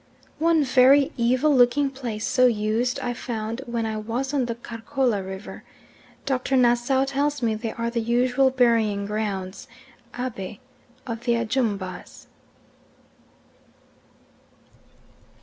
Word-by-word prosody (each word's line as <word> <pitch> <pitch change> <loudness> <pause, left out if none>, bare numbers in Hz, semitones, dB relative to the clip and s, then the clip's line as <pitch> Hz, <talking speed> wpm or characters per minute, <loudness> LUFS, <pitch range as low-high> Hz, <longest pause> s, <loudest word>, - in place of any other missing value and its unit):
One 325 -1 +3
very 270 +2 +5
evil 255 +5 +2
looking 260 +3 +3
place 240 -5 -5
so 255 -1 +4
used 230 +3 0
I 245 -2 -2
found 230 -1 -4
when 235 -1 -2
I 220 -1 -3
was 235 +6 -3
on 270 -3 +1
the 235 - -3
Karkola 235 -1 -2
river. 190 +2 -8 0.6
Dr. 265 0 0
Nassau 245 +2 +3
tells 280 0 -1
me 225 -1 +2
they 220 +1 -4
are 230 0 -3
the 235 - -1
usual 245 +3 +2
burying 230 -5 +2
grounds 200 -2 -4 0.5
(Abe) 215 -6 -5 0.5
of 230 0 -6
the 240 - +3
Ajumbas. 225 -5 -3
240 Hz, 115 wpm, -24 LUFS, 220-265 Hz, 0.6 s, very